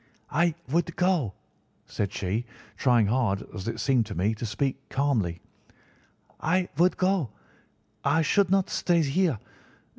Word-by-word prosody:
"'I 170 0 +2
would 170 +2 0
go,' 175 - +1 0.5
said 100 -2 -3
she, 100 +4 -2 0.3
trying 120 -4 +3
hard, 105 -3 +1
as 95 -1 -6
it 115 - -3
seemed 125 -6 +2
to 100 - -6
me, 100 +6 +1
to 110 +2 -4
speak 135 +5 -2
calmly; 115 -12 0 1.0
'I 180 +3 +1
would 180 +2 +4
go. 185 - +1 0.7
I 160 +4 +3
should 195 +5 +3
not 195 0 +2
stay 170 -2 +2
here. 155 - +1
135 Hz, 140 wpm, -27 LUFS, 110-175 Hz, 1.0 s, would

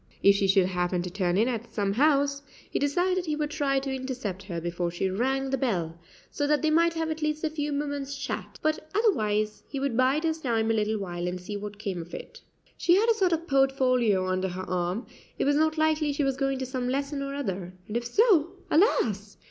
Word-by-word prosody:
If 200 - +8
she 200 0 +1
should 195 -1 +4
happen 180 -1 -1
to 180 - -5
turn 180 -1 0
in 220 +4 +3
at 235 -2 -3
some 200 -2 0
house, 280 +2 +3 0.3
he - - -2
decided 355 +5 +1
he 305 - 0
would 300 0 -2
try 280 -3 +1
to 270 0 -1
intercept 255 -8 -4
her 185 -4 -5
before 175 +1 -2
she 180 +2 -2
rang 265 +6 0
the 270 - 0
bell, 170 -10 -1 0.3
so 290 - -1
that 300 +1 +2
they 310 - +3
might 335 +1 +3
have 325 -1 -1
at 315 0 -4
least 305 +1 -1
a 315 - 0
few 295 -1 -2
moments' 285 -1 -3
chat, - - -5
but 310 0 -1
otherwise 215 - +1
he 275 - -4
would 275 -3 -1
bide 260 +5 +3
his 320 -1 0
time 225 -5 +1
a - - +2
little 215 0 0
while 175 -3 -4
and 180 +1 -3
see 200 +3 -6
what 205 0 -6
came 195 -4 -3
of 170 +1 -9
it. - - -10 0.4
She 345 - +4
had 440 +4 +3
a - - +6
sort 385 -5 +1
of 330 0 0
portfolio 255 - +2
under 185 0 0
her 185 +1 -5
arm; 180 +5 -1 0.3
it - - 0
was 285 +1 +3
not 315 +1 +3
unlikely 310 -1 +1
she 285 - 0
was 270 -1 +1
going 270 0 0
to 260 - -3
some 255 -1 -3
lesson 275 +2 -2
or 275 0 -4
other, 190 -10 -3 0.2
and 210 - -6
if 240 0 -1
so, 355 - +4 0.2
alas! 215 - +2
265 Hz, 230 wpm, -27 LUFS, 200-300 Hz, 0.4 s, If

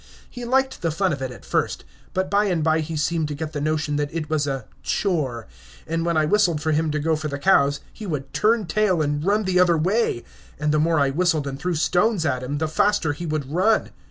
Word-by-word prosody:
He 245 -1 -8
liked 265 +2 +1
the 165 - 0
fun 180 +3 0
of 140 - -5
it 130 - -2
at 125 - -12
first, - - -1 0.3
but 185 0 0
by 200 +2 +2
and 175 -5 0
by 160 0 +3
he 160 0 -3
seemed 155 +1 0
to 150 - -4
get 155 +1 -5
the 145 - -3
notion 155 -1 0
that 145 0 -2
it 155 -2 -4
was 150 -2 +1
a 135 -5 -3 0.2
"chore," 140 - -1 0.4
and 165 +1 -2
when 170 -1 0
I 155 - +3
whistled 175 -2 +2
for 155 +1 -1
him 155 +1 +1
to 150 - -1
go 160 +2 +1
for 155 0 -4
the 140 -1 -4
cows, 145 -4 +3
he 215 - -8
would 135 -5 -4
turn 220 0 +2
tail 185 -3 +1
and 145 0 -1
run 205 +4 +2
the 185 -2 +1
other 175 -2 +4
way, 185 - 0 0.4
and 150 0 +1
the 155 - +2
more 160 0 +2
I 140 -1 +2
whistled 160 -1 +1
and 135 -1 -5
threw 180 +1 -1
stones 180 +3 +1
at 130 -4 0
him, 135 +3 -3
the 160 +1 -1
faster 160 -1 +1
he 170 +4 -6
would 150 -3 -3
run. 200 +7 +2
160 Hz, 245 wpm, -23 LUFS, 145-185 Hz, 0.4 s, other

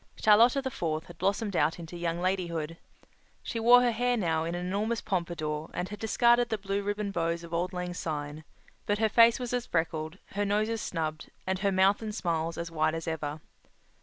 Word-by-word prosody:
Charlotta 235 +6 +5
the 265 - -2
Fourth 160 -6 -2
had 170 -2 -14
blossomed 200 +2 0
out 155 0 +2
into 170 0 -9
young 170 0 -2
ladyhood. 170 -4 -2 0.7
She 230 - -3
wore 245 +2 +7
her 245 - +3
hair 245 +2 +1
now 165 -6 0
in 170 +1 -3
an 175 0 -3
enormous 210 +5 -1
pompador 165 -5 -3
and 180 +1 -3
had 210 -1 -7
discarded 240 +2 +3
the 220 - 0
blue 200 0 -2
ribbon 205 0 -2
bows 170 -2 -1
of 170 0 -10
auld 175 +2 0
lang 180 -1 -4
syne, 150 -2 -4 0.4
but 205 - +1
her 220 0 +2
face 230 +3 +6
was 245 -1 -4
as 245 -1 -1
freckled, 160 0 -2
her 205 +1 -1
nose 210 +2 +1
as 225 -1 -2
snubbed, 155 -2 -3 0.2
and 190 0 -1
her 200 0 +1
mouth 190 +2 +3
and 215 -2 -4
smiles 165 -4 -1
as 170 0 -4
wide 155 0 +1
as 165 0 -5
ever. 155 -1 -3
180 Hz, 205 wpm, -29 LUFS, 165-215 Hz, 0.7 s, wore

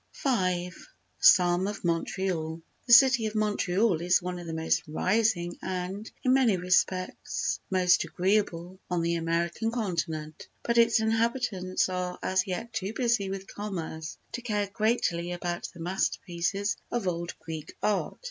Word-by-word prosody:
v—A 185 -9 +1 0.5
Psalm 180 0 +5
of 205 0 -5
Montreal 165 -1 -1 0.3
The 240 - +5
City 240 -2 +7
of 215 - -6
Montreal 205 -3 +1
is 175 +1 +3
one 180 0 -5
of 175 - -8
the - - -4
most 160 0 +1
rising 185 +1 0
and, 190 +3 -4
in 255 - +4
many 250 -7 +4
respects, 185 +1 0
most 185 -2 +3
agreeable 185 -2 -1
on 175 -2 0
the 170 0 +1
American 170 +6 -1
continent, 170 -9 -3 0.2
but 235 0 +2
its 230 -1 +5
inhabitants 225 -4 0
are 180 -1 -3
as 185 0 +1
yet 210 +5 -4
too 210 -1 -3
busy 235 -5 +1
with 195 0 -5
commerce 165 -6 -5
to 245 - -5
care 210 -4 -1
greatly 180 -6 0
about 175 0 -4
the 175 - -15
masterpieces 180 +2 -1
of 235 -6 -2
old 170 -1 -3
Greek 160 -1 -8
Art. 210 -2 0
185 Hz, 145 wpm, -28 LUFS, 175-215 Hz, 0.5 s, City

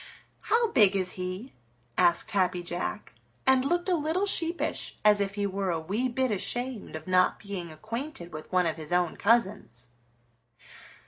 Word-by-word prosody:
"How 465 -1 +2
big 205 -6 +5
is 185 -2 0
he?" 185 +7 -6 0.4
asked 175 +3 +3
Happy 185 -3 +1
Jack, 175 +1 -4 0.3
and 265 -1 +4
looked 345 +6 0
a 370 - +2
little 330 +4 0
sheepish 340 -3 0
as 210 -1 +6
if 200 0 -2
he 205 -1 -1
were 195 -1 -2
a 165 -2 0
wee 210 +11 -1
bit 255 0 0
ashamed 240 +1 -2
of 155 0 -7
not 185 0 +3
being 190 -5 -6
acquainted 215 - -6
with 155 0 -8
one 180 -1 +3
of 165 -1 -1
his 155 0 -7
own 175 -1 +1
cousins. 200 - 0
200 Hz, 165 wpm, -28 LUFS, 180-255 Hz, 0.4 s, as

